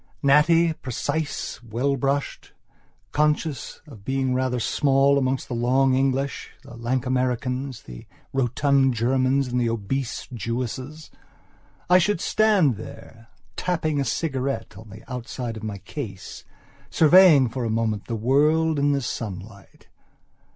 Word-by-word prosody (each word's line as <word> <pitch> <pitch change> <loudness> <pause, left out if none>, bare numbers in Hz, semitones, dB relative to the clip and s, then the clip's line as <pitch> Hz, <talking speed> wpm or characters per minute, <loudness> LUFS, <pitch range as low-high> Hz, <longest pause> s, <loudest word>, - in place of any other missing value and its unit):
Natty, 160 +4 +4
precise, 145 -1 -4
well 120 +4 -1
brushed, 140 +2 -2 0.6
conscious 150 -3 -1
of 120 -10 -14
being 135 +1 -1
rather 130 -1 0
small 135 +4 +2
amongst 130 0 -1
the - - -5
long 130 +3 +2
English, 135 +1 -1
the 120 - -12
lank 120 +3 -2
Americans, 125 0 -2
the - - -11 0.3
rotund 135 0 +2
Germans, 130 +3 +1
and 125 0 0
the 120 - +1
obese 115 +3 -3
Russian 125 - -10
Jewesses, 130 +7 -5 0.8
I 180 +1 +6
should 205 +1 +1
stand 195 - +2
there, 115 +1 -12 0.3
tapping 155 -5 -1
a - - +1
cigarette 135 -7 -3
on 110 +3 -12
the 105 +2 -12
outside 125 -1 -5
of 110 - -8
my 110 -2 -5
case, 100 -4 -8 0.4
surveying 160 -4 +6
for 120 +2 -4
a 115 - -1
moment 110 -2 -1
the 115 - -2
world 150 +7 +2
in 145 0 +2
the 140 - 0
sunlight. 100 -3 -7
130 Hz, 135 wpm, -24 LUFS, 115-140 Hz, 0.8 s, I